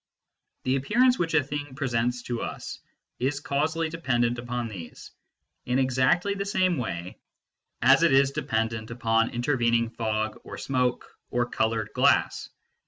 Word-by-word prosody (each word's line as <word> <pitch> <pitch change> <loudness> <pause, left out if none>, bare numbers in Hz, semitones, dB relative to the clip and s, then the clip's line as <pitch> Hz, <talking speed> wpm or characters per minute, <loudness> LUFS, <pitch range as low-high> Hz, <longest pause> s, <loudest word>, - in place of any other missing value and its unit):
The 130 +1 +1
appearance 245 - +3
which 165 -2 0
a 155 - +4
thing 145 -1 -5
presents 125 -3 -1
to 120 -1 -3
us - - -6 0.4
is 135 +3 0
causally 155 +4 0
dependent 120 -7 0
upon 120 0 -3
these, 90 -7 -9 0.6
in 125 +1 +1
exactly 130 +9 +2
the 200 0 -3
same 185 - +1
way 90 -6 -5 0.6
as - - +6
it - - +4
is 135 0 +5
dependent 110 -3 -2
upon 115 -1 +1
inter 125 +4 -1
vening 115 -1 +1
fog 110 -1 -2
or - - -8
smoke 125 -2 0 0.2
or 120 0 +1
coloured 110 -2 -1
glass. - - +2
125 Hz, 145 wpm, -26 LUFS, 115-145 Hz, 0.6 s, as